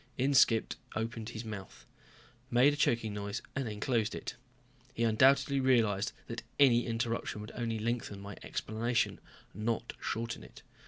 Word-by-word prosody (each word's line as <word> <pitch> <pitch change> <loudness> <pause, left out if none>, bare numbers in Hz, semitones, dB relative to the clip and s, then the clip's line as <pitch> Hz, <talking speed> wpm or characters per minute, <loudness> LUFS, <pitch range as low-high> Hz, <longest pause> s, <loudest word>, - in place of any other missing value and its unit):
Inskipp 130 -4 +4 0.2
opened 110 0 -3
his 115 -1 -6
mouth, 105 -3 -8 0.6
made 125 +4 +5
a - - -2
choking 115 -6 +1
noise, 100 +1 -3
then 115 -6 -3
closed 115 -1 +1
it. - - -5 0.6
He 115 - 0
undoubtedly 135 +5 +4
realized 115 -6 +3
that 115 0 -5 0.2
any 125 -4 +5
interruption 115 -2 -2
would 105 +1 -7
only 115 -2 -2
lengthen 110 -2 -2
my 100 0 -8
explanation, 115 +2 -1 0.3
not 115 +3 -2
shorten 115 - -3
it. - - -14
115 Hz, 140 wpm, -32 LUFS, 110-120 Hz, 0.6 s, made